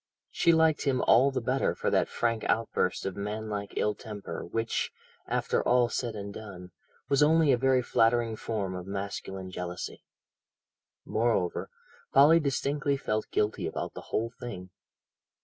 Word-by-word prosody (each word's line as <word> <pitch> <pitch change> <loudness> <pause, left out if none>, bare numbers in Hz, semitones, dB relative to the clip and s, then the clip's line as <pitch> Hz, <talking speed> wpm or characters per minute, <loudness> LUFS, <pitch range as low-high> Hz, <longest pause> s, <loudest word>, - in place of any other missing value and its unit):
She 170 - +3
liked 160 -2 +3
him 130 -2 +1
all 130 +4 +5
the 135 - -1
better 130 +3 0
for - - -1
that - - +2
frank 115 -2 -1
outburst 115 -5 0
of 95 - -3
manlike 105 0 -4
ill 105 - +2
temper 105 -5 -7
which, 115 +5 -2 0.4
after - - 0
all 120 -1 +3
said 120 -2 -3
and 100 -1 -6
done, 95 -5 -9 0.4
was 140 0 +2
only 155 0 +5
a 125 - +4
very 130 0 +3
flattering 115 -1 +2
form 105 -4 -3
of 90 0 -6
masculine 95 -1 -5
jealousy. 90 -1 -6 1.0
Moreover, 110 -6 0 0.5
Polly 150 +5 +7
distinctly 140 -1 0
felt 110 -5 -2
guilty 105 +1 0
about - - -4
the - - -7
whole 115 +1 -1
thing. 95 -6 -7
115 Hz, 150 wpm, -29 LUFS, 100-130 Hz, 1.0 s, Polly